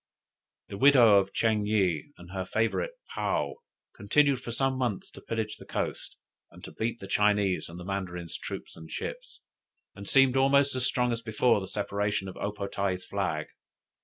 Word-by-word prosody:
The 100 - -7
widow 120 -7 +7
of 95 0 -2
Ching 110 -2 +1
yih, 95 - +1
and 90 0 -13
her 95 -1 -3
favorite 115 - -1 0.2
Paou, - - 0 0.4
continued 140 -3 +2
for 120 - -6
some 135 +2 0
months 125 -7 -2
to - - -12
pillage 110 -2 -3
the - - -13
coast, - - -4 0.3
and - - -16
to - - -8
beat 115 +1 -3
the - - -8
Chinese 100 -2 +2
and 85 +1 -9
the 90 - -8
Mandarins' 90 -3 -4
troops - - -7
and 80 -1 -11
ships, - - -6 0.5
and 100 0 -9
seemed 135 -1 +5
almost 140 +1 +4
as 130 0 +1
strong 125 -1 +1
as 115 0 -2
before 110 0 +2
the 95 - -6
separation 100 0 -2
of 95 - -7
O 100 - -2
po 105 -1 -5
tae's 100 -2 -2
flag. 90 -7 -2
105 Hz, 180 wpm, -28 LUFS, 95-125 Hz, 0.5 s, widow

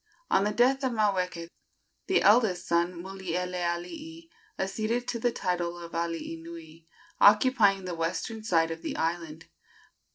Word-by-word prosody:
On 195 - +4
the 210 - +1
death 255 +5 +3
of 260 -2 0
Maweke, 185 -6 0 0.6
the 380 - +3
eldest 205 -4 +4
son, 170 0 0
Mulielealii, 185 - -4 0.3
acceded 220 +5 -2
to 235 - -2
the 240 +1 +1
title 175 -4 -2
of 170 -1 -9
alii 165 -1 -3
nui, 165 -1 -11 0.3
occupying 210 -3 +5
the 180 - -4
western 180 +7 -3
side 165 -5 +2
of 165 0 -6
the - - -4
island. 165 -1 -3
180 Hz, 135 wpm, -28 LUFS, 170-220 Hz, 0.6 s, occupying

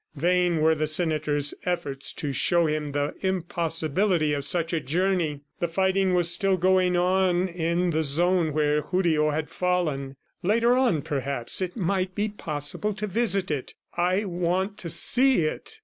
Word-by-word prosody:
Vain 175 +1 +1
were 160 +1 +4
the 155 0 -1
senator's 155 -3 0
efforts 170 -7 -1
to 145 -2 -4
show 170 +6 +2
him 155 -1 -1
the 145 +1 -2
impossibility 170 -2 0
of 140 -1 -2
such 165 +3 0
a 165 - +1
journey. 165 -1 -1 0.2
The 175 - 0
fighting 190 +2 +1
was 175 -1 +3
still 195 0 +1
going 185 0 +2
on 185 0 +2
in 170 0 -1
the 160 0 0
zone 165 +3 +1
where 150 0 +1
Julio 160 -2 +1
had 150 +1 -3
fallen. 155 -7 -1 0.3
Later 230 +6 +2
on, 240 - +1
perhaps, 140 0 -1
it 185 +3 -3
might 185 -1 -1
be 210 +1 -1
possible 165 +2 -3
to 210 - -3
visit 200 -3 -1
it. 140 -4 -4 0.2
"I 185 +4 +1
want 180 +2 -2
to 170 - -6
see 250 - +4
it!" 155 - -5
175 Hz, 160 wpm, -25 LUFS, 155-185 Hz, 0.3 s, were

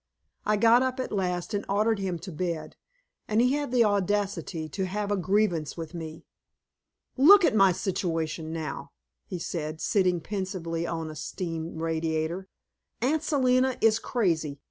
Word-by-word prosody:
I 210 0 +3
got 230 +3 +6
up 260 0 -1
at 255 - -3
last 180 -3 -2
and 205 - -1
ordered 210 +2 +2
him 185 -3 -2
to 185 +2 -7
bed, 160 -2 -4 0.5
and 215 +1 +1
he 250 +2 +4
had 290 -2 -1
the 245 -2 +5
audacity 200 -5 0
to 185 +5 -3
have 205 +2 -3
a - - +3
grievance 185 -4 0
with 165 0 -6
me. 160 -2 -7 0.9
"Look 365 +8 +8
at - - +3
my 195 -2 +6
situation 165 -3 -2
now!" 155 -3 -5 0.3
he 185 - -4
said, 160 -2 -4
sitting 180 -2 +2
pensively 170 -3 -3
on 165 -2 -3
a - - -9
steam 165 +1 -5
radiator. 165 +2 -1 0.5
"Aunt 285 +6 +1
Selina 260 -4 +2
is 225 0 +4
crazy. 160 - -1
185 Hz, 155 wpm, -27 LUFS, 165-215 Hz, 0.9 s, Look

